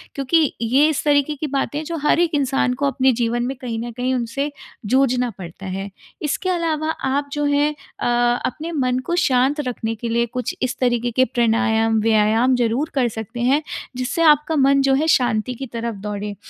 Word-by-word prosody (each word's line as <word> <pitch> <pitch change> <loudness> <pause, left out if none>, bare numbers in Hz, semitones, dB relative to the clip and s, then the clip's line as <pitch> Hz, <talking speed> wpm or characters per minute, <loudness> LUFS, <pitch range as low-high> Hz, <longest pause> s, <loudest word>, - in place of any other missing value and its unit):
क्योंकि 285 +2 +2
ये 265 +7 +4
इस 310 - -1
तरीके 290 0 +2
की 300 +2 -4
बातें 280 +1 -2
हैं, 310 - -6
जो 335 +1 -4
हर 330 - +4
एक 345 -2 +2
इंसान 270 -2 +1
को 280 +2 -1
अपने 265 -1 +2
जीवन 240 0 -1
में 265 +2 -3
कहीं 230 -3 -4
न 240 - -6
कहीं 250 +2 -2
उनसे 255 +4 -2 0.3
जूझना 250 +1 +2
पड़ता 180 +1 -9
है। 195 +1 -4 0.3
इसके 315 +5 -2
अलावा 320 -3 -1 0.2
आप 285 +1 -1
जो 295 0 -1
हैं 290 +1 +2 0.3
अ, 240 0 +2
अपने 315 +5 -4
मन 255 -5 0
को 345 - -1
शांत 270 -2 +2
रखने 225 -2 -3
के 230 +2 -5
लिए 235 +1 +1
कुछ 250 +2 -4
इस 255 - -1
तरीके 240 -1 +1
के 260 +3 +3
प्राणायाम, 225 -1 +1
व्यायाम 225 +3 +3
ज़रूर 245 +5 0
कर 260 -3 +2
सकते 225 +1 -6
हैं 270 +5 +3 0.4
जिससे 255 +6 -2
आपका 305 0 +4
मन 275 -1 +4
जो 270 0 +3
है 305 +4 +1
शांति 245 -1 -1
की 270 - -6
तरफ़ 230 -1 -3
दौड़े। 205 0 -4
255 Hz, 195 wpm, -21 LUFS, 235-285 Hz, 0.4 s, ये